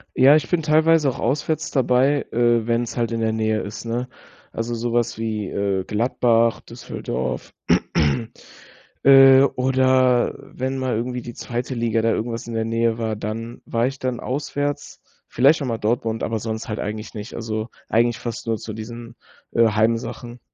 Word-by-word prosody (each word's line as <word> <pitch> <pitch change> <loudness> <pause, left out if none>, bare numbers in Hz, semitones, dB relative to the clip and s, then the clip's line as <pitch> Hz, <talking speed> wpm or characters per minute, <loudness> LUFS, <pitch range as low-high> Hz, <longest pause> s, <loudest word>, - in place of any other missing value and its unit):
Ja, 135 +3 +7
ich 155 - +1
bin 175 -2 +1
teilweise 155 -1 +4
auch 130 - -5
auswärts 150 +4 -1
dabei, 135 +2 +2
äh, 120 -1 +2
wenn's 120 +1 -1
halt 115 -1 0
in 115 - -2
der 110 0 +1
Nähe 110 0 0
ist, 105 - -7
ne? 120 +2 -3 0.4
Also 115 +1 -3
so 115 +1 -3
was 120 -1 0
wie, 110 -3 -3
äh, 100 -2 -1
Gladbach, 115 0 +1
Düsseldorf, 65 +1 -5 1.5
äh, 135 -1 +8
oder 130 -1 +3
wenn 130 +1 -4
mal 130 -2 -1
irgendwie 125 +2 -3
die 120 - -8
2. 120 +3 -4
Liga 115 -1 0
da 115 - +3
irgendwas 115 +1 -3
in 120 - -6
der 115 0 0
Nähe 115 0 0
war, 110 -1 -1
dann 115 +3 -6
war 115 +1 0
ich 135 +1 -5
dann 125 -2 -2
auswärts. 145 +2 -3 0.3
Vielleicht 140 +6 +4
auch - - -2
mal 115 -3 -2
Dortmund, 115 +1 -1
aber 115 - -1
sonst 110 0 -5
halt 110 - -3
eigentlich 105 +1 -5
nicht. 105 +2 -7
Also, 110 0 -4 0.2
eigentlich 120 +1 +2
fast 120 -2 -5
nur 115 -1 0
zu 110 - -7
diesen, 115 +2 -8 0.4
äh, 115 0 +5
Heim-Sachen. 115 +2 -1
120 Hz, 170 wpm, -22 LUFS, 115-130 Hz, 1.5 s, äh